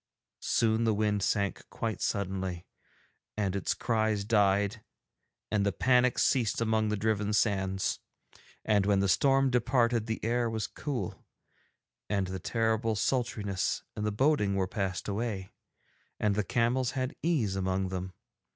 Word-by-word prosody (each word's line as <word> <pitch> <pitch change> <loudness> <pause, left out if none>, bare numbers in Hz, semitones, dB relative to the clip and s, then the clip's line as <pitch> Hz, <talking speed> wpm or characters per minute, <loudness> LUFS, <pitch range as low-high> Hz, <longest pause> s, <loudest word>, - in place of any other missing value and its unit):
Soon 115 0 +2
the 110 -2 +2
wind 105 -1 +1
sank 100 0 0
quite 115 -1 -3
suddenly, 95 -3 -2 0.7
and 100 -3 0
its 100 - -1
cries 110 -3 0
died, 100 0 +2 0.7
and 105 -2 +2
the 100 - +2
panic 125 +6 +3
ceased 120 -6 +2
among 110 -1 +1
the 105 - 0
driven 105 0 0
sands. 95 -3 +1 0.7
And 100 -2 +2
when 100 -1 +3
the 100 - +2
storm 135 +6 +3
departed 120 -2 +2
the 110 - -2
air 120 0 +1
was 110 -1 -2
cool, 130 - -5 0.9
and 100 -1 +1
the 95 0 -5
terrible 110 +2 0
sultriness 105 -5 -1
and 105 - -3
the 105 - 0
boding 105 -4 +2
were 95 -1 +1
passed 95 -2 -3
away, 100 -2 -3 0.7
and 105 -1 +2
the 105 +1 0
camels 120 +4 +1
had 130 +1 -2
ease 135 - +1
among 95 0 -1
them. 95 0 -5
105 Hz, 140 wpm, -30 LUFS, 100-115 Hz, 0.9 s, panic